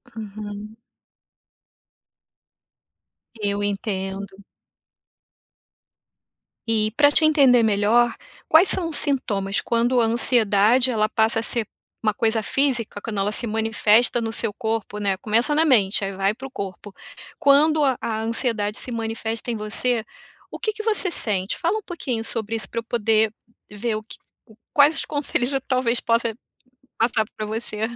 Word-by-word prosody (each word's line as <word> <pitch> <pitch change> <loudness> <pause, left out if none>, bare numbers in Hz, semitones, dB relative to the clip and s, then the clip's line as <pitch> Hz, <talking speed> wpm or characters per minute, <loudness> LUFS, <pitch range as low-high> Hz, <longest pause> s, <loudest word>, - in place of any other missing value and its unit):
Uhum. 210 0 -8 2.7
Eu 205 0 -1
entendo. 195 -1 -5 2.2
E 215 -1 +1
pra 290 +1 +4
te 310 - +3
entender 275 -6 +4
melhor, 220 +2 +2 0.3
quais 335 +4 +5
são 345 -3 +5
os 320 - -2
sintomas 205 -9 +2
quando 240 +2 0
a 230 - +3
ansiedade 230 0 +3
ela 215 -2 0
passa 225 0 +1
a - - -6
ser 235 -3 +1 0.4
uma 215 -1 0
coisa 225 +1 0
física, 245 -7 -1
quando 210 -2 -5
ela 200 +2 0
se 240 - +2
manifesta 225 +2 +2
no 225 0 -3
seu 210 - +2
corpo, 220 -2 -4
né. 200 -2 -1
Começa 230 +8 +1
na 320 +1 +3
mente, 210 -8 +2
aí 195 - -4
vai 195 +2 0
para 265 +4 -9
o - - -18
corpo. 195 -2 -8 0.5
Quando 300 +2 +4
a 265 -3 +1
a 220 -1 -3
ansiedade 225 -2 0
se 255 - -2
manifesta 225 0 -4
em 230 - -3
você, 220 +2 -1 0.5
o - - -7
que 435 - -1
que 435 +1 -7
você 420 -4 +3
sente? 195 - 0
Fala 360 +6 -1
um - - -13
pouquinho 255 -10 -4
sobre 225 -1 -3
isso 205 -4 -3
para 230 - -4
eu 230 - -8
poder 220 -1 0 0.4
ver 215 +2 -3
o 215 - -6
que 220 - -12 0.6
quais 290 +2 +4
os - - -2
conselhos 285 -3 -1
eu 270 - -1
talvez 255 -2 -1
possa 230 -1 0 0.6
passar 225 -1 0
para 215 - -4
você. 215 0 -6
225 Hz, 150 wpm, -22 LUFS, 210-250 Hz, 2.7 s, quais